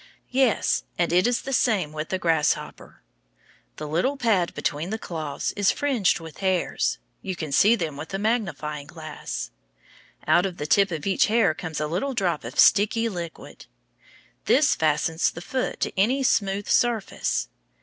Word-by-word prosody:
Yes, 260 Hz, -3 st, +2 dB
and 170 Hz, -1 st, +1 dB
it 180 Hz, +5 st, +4 dB
is 245 Hz, -1 st, 0 dB
the 270 Hz, -, -4 dB
same 215 Hz, -, +1 dB
with 155 Hz, 0 st, -5 dB
the 190 Hz, -, 0 dB
grasshopper. 165 Hz, -4 st, -1 dB, 0.7 s
The 150 Hz, -, -6 dB
little 175 Hz, -, 0 dB
pad 210 Hz, -9 st, +1 dB
between 150 Hz, +5 st, -2 dB
the 220 Hz, -, -2 dB
claws 155 Hz, -8 st, -4 dB
is 205 Hz, -2 st, +2 dB
fringed 260 Hz, -13 st, +1 dB
with 160 Hz, -2 st, -11 dB
hairs. 185 Hz, -, 0 dB, 0.2 s
You 185 Hz, -, -4 dB
can 155 Hz, -4 st, -5 dB
see 205 Hz, +11 st, +5 dB
them 160 Hz, -9 st, -4 dB
with 155 Hz, -, -7 dB
a 195 Hz, -, -3 dB
good -, -, -6 dB
magnifying 155 Hz, -, -2 dB
glass. 155 Hz, -, -6 dB, 0.7 s
Out 175 Hz, +2 st, +4 dB
of 180 Hz, -2 st, -8 dB
the 150 Hz, -, -4 dB
tip 200 Hz, +5 st, +3 dB
of 160 Hz, -4 st, -5 dB
each 195 Hz, -1 st, +3 dB
hair 220 Hz, -6 st, +3 dB
comes 160 Hz, -1 st, -5 dB
a 150 Hz, -, 0 dB
little 185 Hz, -, -2 dB
drop 180 Hz, -8 st, 0 dB
of 115 Hz, +2 st, -6 dB
sticky 220 Hz, +3 st, +4 dB
liquid. 170 Hz, -5 st, -8 dB, 0.8 s
This 285 Hz, +2 st, +4 dB
fastens 160 Hz, +1 st, +1 dB
the -, -, -9 dB
foot 255 Hz, +9 st, -3 dB
to -, -, -1 dB
any 245 Hz, +8 st, +2 dB
smooth 200 Hz, -4 st, +1 dB
surface. 220 Hz, -, 0 dB
180 Hz, 170 wpm, -24 LUFS, 155-220 Hz, 0.8 s, see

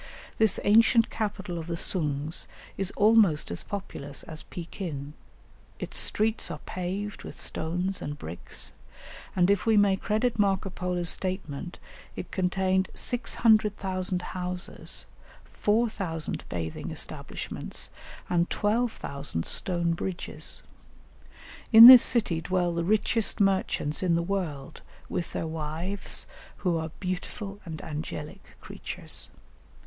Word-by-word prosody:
This 220 Hz, -2 st, +4 dB
ancient 230 Hz, +2 st, +5 dB
capital 200 Hz, -5 st, -3 dB
of 160 Hz, -, -7 dB
the 170 Hz, -1 st, -3 dB
Soongs 150 Hz, -3 st, 0 dB, 0.3 s
is 195 Hz, -1 st, -2 dB
almost 210 Hz, -, +4 dB
as 85 Hz, -, -3 dB
populous 145 Hz, -8 st, -5 dB
as 155 Hz, -1 st, -8 dB
Pekin; 165 Hz, -5 st, -6 dB, 0.6 s
its -, -, -6 dB
streets 220 Hz, +1 st, +1 dB
are -, -, -4 dB
paved 195 Hz, +3 st, -4 dB
with -, -, -9 dB
stones 180 Hz, +4 st, -2 dB
and 145 Hz, 0 st, -4 dB
bricks, 85 Hz, -, -4 dB, 0.6 s
and 180 Hz, +1 st, +4 dB
if 200 Hz, +2 st, +1 dB
we 220 Hz, -1 st, +5 dB
may 200 Hz, -2 st, +5 dB
credit 220 Hz, +4 st, 0 dB
Marco 195 Hz, -1 st, +2 dB
Polo's 180 Hz, -1 st, -1 dB
statement, 185 Hz, -3 st, -4 dB, 0.4 s
it -, -, -7 dB
contained 190 Hz, 0 st, +1 dB
"600,000 205 Hz, -6 st, +1 dB
houses, 180 Hz, 0 st, -4 dB, 0.4 s
4000 205 Hz, -7 st, -1 dB
bathing 80 Hz, -2 st, -4 dB
establishments, -, -, -5 dB, 0.4 s
and 175 Hz, 0 st, +1 dB
12,000 205 Hz, -, -1 dB
stone 175 Hz, -2 st, 0 dB
bridges." 175 Hz, +1 st, -2 dB, 1.1 s
In 225 Hz, 0 st, +12 dB
this 250 Hz, -1 st, +13 dB
city 210 Hz, -9 st, +3 dB
dwell 175 Hz, 0 st, 0 dB
the 170 Hz, 0 st, -1 dB
richest 215 Hz, +3 st, +1 dB
merchants 190 Hz, -6 st, +1 dB
in 180 Hz, -3 st, +2 dB
the 170 Hz, -, +1 dB
world 170 Hz, -8 st, -4 dB, 0.3 s
with 175 Hz, -, -3 dB
their -, -, -2 dB
wives, 160 Hz, +5 st, -2 dB, 0.4 s
who 175 Hz, -2 st, +3 dB
are 160 Hz, 0 st, -3 dB
"beautiful 195 Hz, +2 st, -4 dB
and 160 Hz, -2 st, -6 dB
angelic 150 Hz, -1 st, -7 dB
creatures." -, -, -5 dB
185 Hz, 115 wpm, -28 LUFS, 165-205 Hz, 1.1 s, this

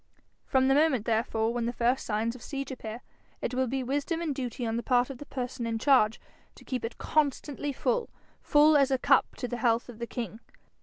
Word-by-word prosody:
From 265 Hz, -1 st, +3 dB
the 270 Hz, -, +5 dB
moment 280 Hz, -6 st, +3 dB
therefore 225 Hz, 0 st, 0 dB
when 240 Hz, -1 st, -1 dB
the -, -, 0 dB
first 245 Hz, +2 st, 0 dB
signs 225 Hz, +2 st, 0 dB
of 255 Hz, -, -12 dB
siege 275 Hz, -1 st, -5 dB
appear, 230 Hz, -2 st, -7 dB, 0.4 s
it -, -, -3 dB
will 260 Hz, 0 st, +1 dB
be 265 Hz, +2 st, -2 dB
wisdom 285 Hz, +6 st, -1 dB
and 330 Hz, -4 st, -1 dB
duty 250 Hz, -2 st, -4 dB
on 225 Hz, 0 st, -1 dB
the 235 Hz, -, -1 dB
part 245 Hz, +1 st, +2 dB
of 255 Hz, -, -9 dB
the 290 Hz, -, -9 dB
person 250 Hz, -2 st, -4 dB
in 225 Hz, -1 st, -1 dB
charge 230 Hz, -3 st, +4 dB, 0.4 s
to -, -, -16 dB
keep 255 Hz, -3 st, -3 dB
it 230 Hz, +1 st, -5 dB
constantly 290 Hz, -1 st, 0 dB
full 475 Hz, -, -1 dB, 0.3 s
full 300 Hz, +1 st, +5 dB
as 280 Hz, -2 st, +5 dB
a 265 Hz, -, +2 dB
cup -, -, +3 dB
to 250 Hz, -, -4 dB
the 245 Hz, -, -4 dB
health 235 Hz, 0 st, +1 dB
of 235 Hz, -2 st, -10 dB
the 235 Hz, -, -4 dB
king. 230 Hz, -3 st, -5 dB
250 Hz, 220 wpm, -29 LUFS, 230-275 Hz, 0.4 s, the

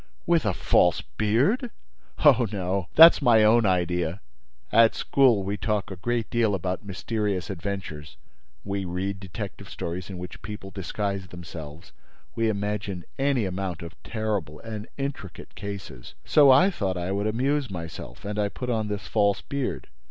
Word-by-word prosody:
"With 170 Hz, -8 st, +2 dB
a 100 Hz, -, +2 dB
false 90 Hz, -2 st, +3 dB
beard?" 140 Hz, -, +1 dB, 0.6 s
"Oh, 125 Hz, -5 st, +6 dB
no! 95 Hz, -2 st, -2 dB
That's 165 Hz, 0 st, +9 dB
my 115 Hz, -5 st, +5 dB
own 110 Hz, 0 st, +5 dB
idea. 90 Hz, -1 st, 0 dB, 0.5 s
At 115 Hz, -1 st, +5 dB
school, 125 Hz, -8 st, +3 dB
we 100 Hz, +2 st, -2 dB
talk 105 Hz, -3 st, -1 dB
a -, -, -5 dB
great 115 Hz, +5 st, -1 dB
deal 115 Hz, -4 st, +2 dB
about 90 Hz, +1 st, -3 dB
mysterious 100 Hz, -2 st, -2 dB
adventures; 85 Hz, -5 st, -6 dB, 0.5 s
we 100 Hz, 0 st, -3 dB
read 95 Hz, +2 st, -3 dB
detective 95 Hz, -3 st, -7 dB
stories, 85 Hz, +2 st, -5 dB
in 95 Hz, -, -6 dB
which 90 Hz, 0 st, -8 dB
people 100 Hz, -1 st, -8 dB
disguise 100 Hz, +1 st, -3 dB
themselves; 85 Hz, -3 st, -10 dB, 0.4 s
we 115 Hz, -1 st, +1 dB
imagine 100 Hz, -3 st, -3 dB, 0.2 s
any 135 Hz, -5 st, +2 dB
amount 95 Hz, -2 st, -4 dB
of 85 Hz, -1 st, -8 dB
terrible 105 Hz, -9 st, -3 dB
and 110 Hz, -1 st, -6 dB
intricate 135 Hz, -, -6 dB
cases. 100 Hz, -11 st, -8 dB
So 145 Hz, -2 st, +6 dB
I 180 Hz, +10 st, +6 dB
thought 95 Hz, -, -2 dB
I 90 Hz, +2 st, -3 dB
would 100 Hz, +2 st, 0 dB
amuse 135 Hz, +5 st, 0 dB
myself; 85 Hz, -7 st, -8 dB
and 105 Hz, +1 st, -3 dB
I 105 Hz, -1 st, +1 dB
put 125 Hz, +4 st, -4 dB
on 110 Hz, -2 st, 0 dB
this 105 Hz, -1 st, -4 dB
false 100 Hz, -2 st, +2 dB
beard. 140 Hz, -2 st, -3 dB
100 Hz, 155 wpm, -26 LUFS, 90-115 Hz, 0.6 s, That's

